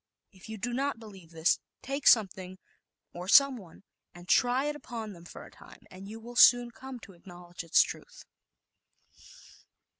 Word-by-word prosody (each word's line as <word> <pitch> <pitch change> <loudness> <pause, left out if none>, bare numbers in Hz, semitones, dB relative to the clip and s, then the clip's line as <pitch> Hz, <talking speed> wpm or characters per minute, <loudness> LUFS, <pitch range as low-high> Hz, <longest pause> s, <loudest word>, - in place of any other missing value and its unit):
If 190 +1 -16
you 220 - -7
do 240 +4 -4
not 275 +1 -2
believe 195 -7 -14
this, 165 +1 0 0.2
take 275 +1 -3
some 220 -4 +6
thing, 185 0 -11 0.6
or 175 +1 -8
someone, 235 - +3 0.3
and 175 0 -14
try 250 +5 +2
it 295 0 -3
upon 230 -7 -8
them 170 -1 -15
for - - -11
a - - -16
time, - - -17
and 190 +1 -11
you 220 +2 -9
will 240 +2 -12
soon 245 0 +6
come 260 +1 -10
to 200 -1 -14
acknowledge 175 0 -12
its 165 - +4
truth. - - -10
215 Hz, 170 wpm, -29 LUFS, 180-245 Hz, 0.6 s, some